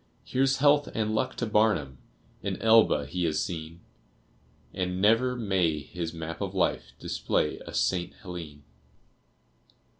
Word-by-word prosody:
Here's 135 +1 +1
health 145 +1 +4
and 110 -1 0
luck 130 +4 -1
to 120 - -2
Barnum! 105 - +1 0.4
An - - -3
Elba 110 -10 +5
he 85 +4 -2
has 75 -2 0
seen, 85 0 -7 0.9
And 90 0 -2
never 115 +5 +3
may 95 -9 +1
his 80 +3 -5
map 80 0 -6
of - - -3
life - - 0
Display 75 - -1
a - - -8
St. 90 -2 0
Helene! 80 -6 -8
90 Hz, 130 wpm, -28 LUFS, 80-115 Hz, 0.9 s, Elba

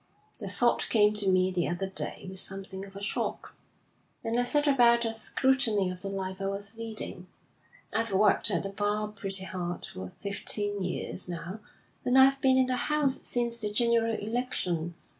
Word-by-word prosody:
'The - - -6
thought 240 -1 +1
came 210 -2 +4
to 205 -2 +4
me 185 0 +3
the 180 -2 -1
other 175 +2 -2
day 190 - -5
with 190 0 -1
something 195 0 -2
of 195 - -16
a 200 - -8
shock, - - -3 0.7
and 230 +2 -1
I - - +2
set 290 +3 +2
about 240 -4 +4
a 225 - -1
scrutiny 225 -4 +1
of 180 0 -9
the 200 - -5
life 190 -1 -5
I 195 - -1
was 200 +2 -4
leading. 220 -5 -6 0.7
I've 225 -1 0
worked 200 +1 +4
at - - 0
the 195 - -4
bar 210 +1 -2
pretty 195 -2 -1
hard 175 -2 -5
for 95 0 -8
fifteen 205 - -1
years 180 0 -2
now, 175 +4 -6 0.4
and 250 +1 +2
I've 270 +1 +5
been 260 -1 +4
in 260 - +4
the 255 0 -1
House 295 -1 +1
since 235 -1 +3
the 210 -2 -2
general 230 +1 +2
election. 205 -8 -3
205 Hz, 180 wpm, -28 LUFS, 190-235 Hz, 0.7 s, I've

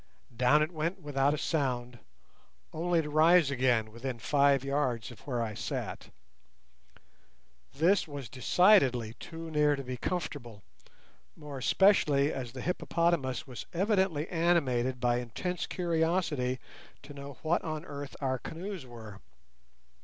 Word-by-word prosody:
Down 125 +6 +4
it 155 - -3
went 165 +3 -2
without 145 -2 +1
a - - -5
sound, 125 -6 -2 0.7
only 170 +1 +1
to 150 - -6
rise 160 0 +5
again 120 -5 +1
within 120 +2 -5
five 140 +2 +3
yards 135 -4 -1
of 120 - -13
where 120 -4 -1
I 110 -2 -4
sat. - - -5 1.6
This 180 +5 +2
was 145 -4 -7
decidedly 130 - +3
too 165 0 -8
near 150 -1 +3
to 140 - -6
be 125 -1 -5
comfortable, 120 - -4 0.7
more 150 -3 -8
especially 150 -4 +3
as 125 -3 -5
the 130 - -6
hippopotamus 170 -5 0
was 125 -4 -8
evidently 190 -4 +1
animated 135 -8 +1
by 120 -1 +2
intense 165 +10 -4
curiosity 160 -7 0 0.5
to 145 - -10
know 140 -1 -9
what 165 +2 +1
on 155 0 -4
earth 145 0 -7
our 130 -2 0
canoes 175 -2 -7
were. 110 -4 -10
145 Hz, 130 wpm, -30 LUFS, 125-165 Hz, 1.6 s, rise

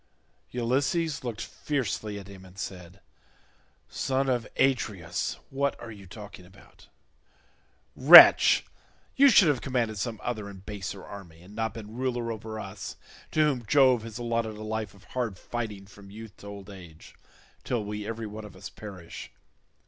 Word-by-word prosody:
Ulysses 135 +7 0
looked 115 -3 -4
fiercely 110 -7 -3
at 100 -1 -9
him 95 -2 -12
and 95 0 -16
said, 90 0 -8 0.9
"Son 135 0 -1
of 125 -2 0
Atreus, 105 -11 0
what 140 +1 -1
are 115 - -8
you 100 -3 -12
talking 100 -1 -11
about? 95 +2 -19 1.1
Wretch, - - +9 0.5
you 280 +1 +7
should 200 -7 +7
have 145 -5 +2
commanded 120 -6 -1
some 110 +2 -3
other 110 -4 -3
and 95 -1 -12
baser 100 -2 -6
army, 85 -5 -11
and 95 +3 -14
not 110 +1 -3
been 110 -1 -9
ruler 120 -2 -2
over 110 0 -6
us 100 -1 -7 0.3
to 155 - +1
whom 140 -5 +2
Jove 130 -2 +5
has 115 0 -8
allotted 115 -2 -2
a 110 - -8
life 110 -2 -4
of 100 - -19
hard 120 -7 -3
fighting 105 -2 -5
from 100 0 -15
youth 110 +1 -11
to 100 - -12
old 100 0 -9
age, 85 -5 -13 0.5
till 115 -4 -2
we 105 0 -5
every 115 0 -4
one 105 +1 -7
of 105 -3 -11
us 100 +1 -9
perish. 95 -5 -10
110 Hz, 160 wpm, -28 LUFS, 100-120 Hz, 1.1 s, Wretch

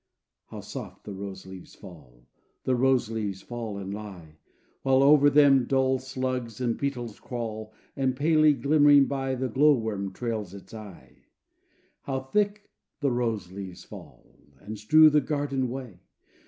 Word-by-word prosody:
How - - -9
soft - - -9
the 105 - -6
rose 95 -1 -8
leaves 95 -1 -12
fall 70 - -15 0.4
The 130 - +1
rose 130 -2 +2
leaves 105 -4 -4
fall 115 -4 -6
and 100 0 -6
lie! 95 -7 -10 0.4
While 135 0 +3
over 145 0 +6
them 140 -3 +5
dull 130 0 +1
slugs 130 -3 -4
and 120 -2 0
beetles 120 -6 -4
crawl, 110 -3 -6 0.2
And, 130 -1 0
palely 155 +1 +4
glimmering 145 +1 +5
by, 135 -1 -2
The 130 +1 -2
glow 145 +5 +4
worm 105 -4 -3
trails 110 -3 -4
its 100 - -13
eye. 105 -4 -12 0.8
How 135 -1 -3
thick 205 +10 -1 0.3
the 140 -3 +1
rose 115 -7 -2
leaves 95 -2 -8
fall, - - -13 0.3
And 105 0 -8
strew 155 +8 +6
the 150 0 +4
garden 140 -2 -2
way! 125 -7 -7
125 Hz, 150 wpm, -27 LUFS, 105-135 Hz, 0.8 s, over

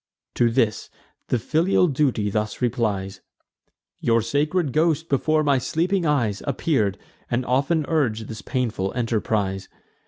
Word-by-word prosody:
To 120 - +3
this, 115 -3 0 0.4
the - - +1
filial 165 - +2
duty 130 -8 0
thus 105 0 -2
replies: 105 -6 -1 0.8
"Your 115 -1 +2
sacred 145 - 0
ghost 160 0 +1
before 155 +3 +2
my 140 -3 +3
sleeping 170 +6 0
eyes 115 -9 +1
Appear'd, 120 - 0 0.3
and 120 +1 0
often 140 +5 +1
urg'd 115 -9 0
this 110 -1 -7
painful 115 -7 -2
enterprise. 105 -5 -1
125 Hz, 125 wpm, -23 LUFS, 110-150 Hz, 0.8 s, To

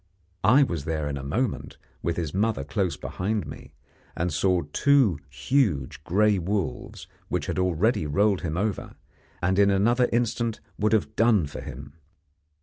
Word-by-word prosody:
I 130 +6 +6
was 85 - -3
there 75 -2 -2
in 70 - -3
a 70 - -5
moment, 105 - -2 0.2
with 85 - -2
his 80 -4 -3
mother 105 -5 0
close 90 +5 -1
behind 105 +3 -3
me, - - -11 0.4
and 85 -1 -1
saw 90 +5 +2
two 135 - +3
huge 75 - 0
gray 105 +3 +2
wolves 90 -6 -3 0.2
which - - -2
had - - -2
already 90 0 +1
rolled 100 +5 +2
him 85 -1 -3
over, 105 +1 -2 0.5
and 95 +2 +2
in 100 0 +5
another 120 +6 +3
instant 115 -1 0 0.2
would 105 +1 +2
have 110 0 0
done 110 -7 +4
for 70 - -7
him. 70 +2 -9
95 Hz, 155 wpm, -26 LUFS, 80-110 Hz, 0.5 s, I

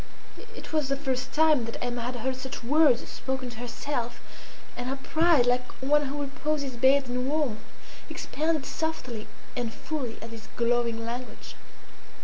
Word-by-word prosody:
It - - -9
was 305 -3 +2
the 275 - +1
first 265 -2 -1
time 305 -5 +5
that 230 - -5
Emma 245 -1 -2
had 250 +2 -2
heard 260 +2 -1
such 260 0 -6
words 280 -1 +5
spoken 260 -2 -3
to 235 - -9
herself, 240 0 -3 0.6
and 245 +1 -3
her 270 - 0
pride, 315 0 +4
like 250 0 +2
one 295 +2 +3
who 290 +2 -3
reposes 285 -1 -2
bathed 265 +2 +5
in 250 +1 -1
warmth, 285 -8 0 0.5
expanded 310 -2 -1
softly 260 -10 -3 0.3
and 240 -3 -1
fully 260 -2 -4
at 225 +1 -8
this 225 -1 -9
glowing 235 -1 +2
language. 245 +2 -6
260 Hz, 155 wpm, -28 LUFS, 240-290 Hz, 0.6 s, time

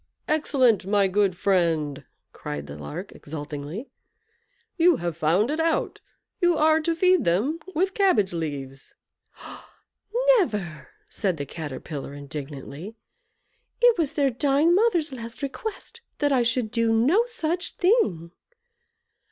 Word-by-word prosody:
"Excellent! 260 -10 +2
my 200 -1 +3
good 190 -1 +1
friend," 160 -7 0 0.3
cried 75 -1 -6
the 70 - -9
Lark, 75 0 -7
exultingly; 150 - -7 0.8
"you 345 0 +5
have 175 - -3
found 170 - +2
it 310 - -2
out. 325 0 0 0.4
You 350 -3 +3
are 315 +1 +4
to 330 +1 0
feed 370 +2 +3
them 220 - +1 0.2
with 380 +4 +1
cabbage 240 - +2
leaves." 140 -5 -6 1.4
"Never!" 195 - -3 0.2
said 190 -6 -2
the 140 - -4
Caterpillar, 145 -1 -7
indignantly. 145 +6 -8 0.8
"It 485 -1 +6
was 310 -4 0
their 280 -3 +2
dying 285 +6 +2
mother's 355 -8 +2
last 230 +2 -8
request 430 - -6 0.2
that 290 -1 +1
I 260 -3 +3
should 235 -1 0
do 230 -1 +1
no 280 - +3
such 350 -7 -3
thing." 205 - +1
225 Hz, 125 wpm, -25 LUFS, -, 1.4 s, It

